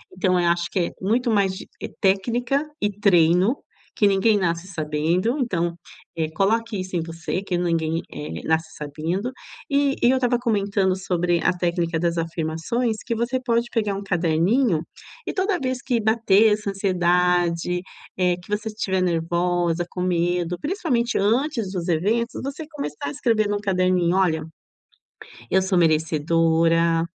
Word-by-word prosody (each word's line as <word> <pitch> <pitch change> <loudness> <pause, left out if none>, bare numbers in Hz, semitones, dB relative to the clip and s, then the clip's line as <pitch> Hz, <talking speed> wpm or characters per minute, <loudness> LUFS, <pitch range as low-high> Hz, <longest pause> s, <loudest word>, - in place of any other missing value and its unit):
Então 185 -1 +2
eu 175 - +2
acho 170 0 +1
que 190 - 0
é 170 - 0
muito 230 +5 +1
mais 195 -3 +2
de, - - -9
eh, - - -3
técnica 240 +9 +1 0.2
e 205 0 +1
treino, 180 - +4 0.4
que 205 - +4
ninguém 200 +2 +3
nasce 170 -1 -1
sabendo, 165 - 0
então, 175 -8 -1 0.4
eh, 160 -1 -1
coloque 220 +3 0
isso 185 0 -5
em 170 - +1
você, 165 +3 -4
que 180 -3 -1
ninguém, 165 -1 0
eh, 80 +1 -6
nasce 160 0 +1
sabendo, 160 - -3 0.4
eh, 280 -1 +2
e 240 - +5
eu 265 - +4
estava 245 -2 +1
comentando 200 -5 +1
sobre 175 -2 0
a - - +4
técnica 170 -2 -1
das 170 0 0
afirmações, 165 +8 -2
que 235 - -1
você 240 +3 -1
pode 235 0 +1
pegar 210 -4 0
um 200 - -4
caderninho 175 - +2 0.5
e - - -2
toda 375 -2 0
vez 255 -1 -2
que 245 -3 0
bater 220 -1 +4
essa 210 -1 -3
ansiedade, 180 -2 +1 0.4
eh, 180 -1 +2
que 175 - -16
você 210 +2 -2
estiver 190 -3 -1
nervosa, 175 0 0
com 180 - -5
medo, 175 0 0
principalmente 285 - -1
antes 230 0 0
dos 180 -1 -3
eventos, 220 +9 0
você 280 +3 -5
começar 150 - -5
a - - -3
escrever 215 +4 +1
num 205 0 0
caderninho: 185 -3 +1
"Olha, 160 -5 +2 1.1
eu 190 - +4
sou 190 -1 +1
merecedora, 165 +1 +2
185 Hz, 155 wpm, -23 LUFS, 170-220 Hz, 1.1 s, e